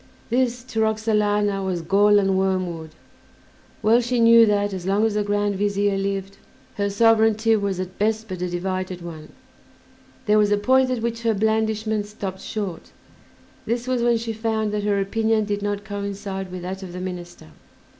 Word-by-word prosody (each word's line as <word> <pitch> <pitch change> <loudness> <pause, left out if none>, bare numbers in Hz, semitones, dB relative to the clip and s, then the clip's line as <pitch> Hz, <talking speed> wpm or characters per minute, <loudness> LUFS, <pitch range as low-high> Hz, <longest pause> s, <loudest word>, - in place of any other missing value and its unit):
This, 245 -1 +1
to 225 -3 -4
Roxalana, 210 -2 +1
was 180 -3 -2
gall 205 +4 +4
and 195 -1 +2
wormwood; 185 -4 -1 0.9
well 225 +3 +5
she 240 0 -1
knew 230 0 +7
that, 205 -1 +1
as 185 -1 -5
long 200 +3 +2
as 220 - 0
the 210 0 0
Grand 205 -1 0
Vizier 205 0 +1
lived, 195 0 -3 0.4
her 200 0 -1
sovereignty 225 +1 +3
was 200 -3 -1
at 185 0 -6
best 220 +1 0
but 185 -3 -6
a 180 - -1
divided 185 0 -3
one. 160 -3 -9 1.0
There 215 0 +4
was 210 -1 +3
a 205 - +4
point 260 +5 +3
at 250 -3 -2
which 230 0 -2
her 225 -2 +1
blandishments 220 0 0
stopped 195 -3 -6
short; 200 -6 -5 0.8
this 235 +1 -1
was 255 -2 0
when 235 0 +3
she 225 0 -4
found 220 -1 -1
that 210 0 -1
her 205 -1 +1
opinion 220 +2 +1
did 205 0 -2
not 205 0 -2
coincide 200 -2 -5
with 180 -1 -6
that 190 +2 -5
of 185 -2 -8
the 180 - -6
minister. 180 - -7
205 Hz, 175 wpm, -23 LUFS, 190-220 Hz, 1.0 s, knew